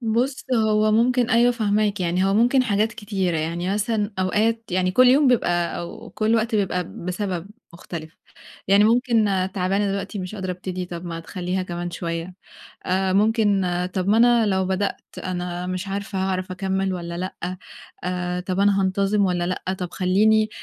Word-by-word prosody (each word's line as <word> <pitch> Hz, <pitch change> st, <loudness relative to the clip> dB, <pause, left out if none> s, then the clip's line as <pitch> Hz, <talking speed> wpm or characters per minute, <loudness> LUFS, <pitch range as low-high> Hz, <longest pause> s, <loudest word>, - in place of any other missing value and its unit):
بُصّ، 245 Hz, +4 st, -1 dB
هو 215 Hz, -1 st, +3 dB
ممكن 245 Hz, +2 st, +2 dB
أيوه 240 Hz, +1 st, +4 dB
فاهماك، 210 Hz, -3 st, 0 dB
يعني 180 Hz, +1 st, +1 dB
هو 195 Hz, +1 st, +2 dB
ممكن 245 Hz, +4 st, +4 dB
حاجات 215 Hz, -1 st, +1 dB
كتيرة، 195 Hz, -6 st, -2 dB
يعني 170 Hz, +4 st, -2 dB
مثلًا 210 Hz, 0 st, 0 dB
أوقات 220 Hz, +5 st, +1 dB
يعني 185 Hz, 0 st, +1 dB
كل 255 Hz, +6 st, +5 dB
يوم 275 Hz, +3 st, +5 dB
بيبقى 175 Hz, -8 st, +1 dB
أو 170 Hz, 0 st, -8 dB
كل 220 Hz, +1 st, +1 dB
وقت 225 Hz, 0 st, 0 dB
بيبقى 180 Hz, -3 st, 0 dB, 0.2 s
بسبب 185 Hz, -1 st, -3 dB, 0.2 s
مختلِف، 165 Hz, -2 st, -9 dB, 0.5 s
يعني 200 Hz, +2 st, +6 dB
ممكن 235 Hz, -1 st, +3 dB, 0.3 s
تعبانة 195 Hz, +2 st, 0 dB
دلوقتي 200 Hz, +1 st, -4 dB
مش 185 Hz, +3 st, -5 dB
قادرة 190 Hz, -2 st, -4 dB
أبتدي، 180 Hz, 0 st, -5 dB
طَب 175 Hz, 0 st, -7 dB
ما 165 Hz, -1 st, -5 dB
تخلّيها 180 Hz, +1 st, -3 dB
كمان 175 Hz, -1 st, -5 dB
شوية 170 Hz, +1 st, -4 dB, 0.5 s
آآ، 190 Hz, 0 st, +1 dB
ممكن 205 Hz, -1 st, +3 dB, 0.3 s
طَب 185 Hz, 0 st, -1 dB
ما 215 Hz, -, +4 dB
أنا 235 Hz, -1 st, +5 dB
لو 190 Hz, -1 st, +1 dB
بدأت 190 Hz, +2 st, -1 dB, 0.2 s
أنا 180 Hz, -1 st, -3 dB
مش 185 Hz, +1 st, -4 dB
عارفة 200 Hz, 0 st, -4 dB
هاعرَف 185 Hz, -1 st, -2 dB
أكمّل 190 Hz, 0 st, -1 dB
والّا 170 Hz, -1 st, -5 dB
لأ 185 Hz, 0 st, -5 dB, 0.5 s
آآ، 180 Hz, 0 st, -2 dB
طَب 185 Hz, +1 st, -2 dB
أنا 200 Hz, -1 st, +3 dB
هانتظم 195 Hz, +2 st, +1 dB
والّا 175 Hz, -1 st, 0 dB
لأ، 185 Hz, +1 st, -2 dB
طَب 180 Hz, -2 st, -4 dB
خلّيني 215 Hz, +4 st, +3 dB
195 Hz, 165 wpm, -23 LUFS, 180-215 Hz, 0.5 s, يعني